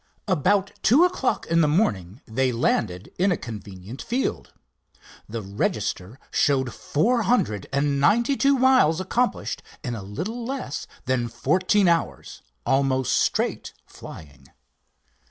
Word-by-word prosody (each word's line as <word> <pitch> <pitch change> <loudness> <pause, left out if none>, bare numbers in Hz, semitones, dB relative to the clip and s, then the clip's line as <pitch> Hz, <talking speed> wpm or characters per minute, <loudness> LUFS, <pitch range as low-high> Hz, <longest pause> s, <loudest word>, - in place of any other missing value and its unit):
About 195 +3 +2
two 255 - +5
o'clock 360 -8 -1
in 165 0 +2
the 155 - +4
morning 110 - 0
they 130 +3 0
landed 105 -5 -1
in 190 +2 +3
a 175 - +1
convenient 105 +1 -9
field. 250 +3 -2 0.8
The 115 0 -5
register 100 +2 -3
showed 130 -4 +1
four 230 +11 +1
hundred 160 - 0
and 140 0 +1
ninety 235 - +3
two 275 0 +3
miles 255 -11 +4
accomplished 235 +6 -1 0.2
in 120 - -3
a 110 - -5
little 175 - -5
less 255 - -4 0.2
than 130 -2 0
fourteen 185 - +2
hours, 170 -1 -1 0.2
almost 135 -1 +1
straight - - 0
flying. 70 -3 -12
140 Hz, 125 wpm, -24 LUFS, -, 0.8 s, two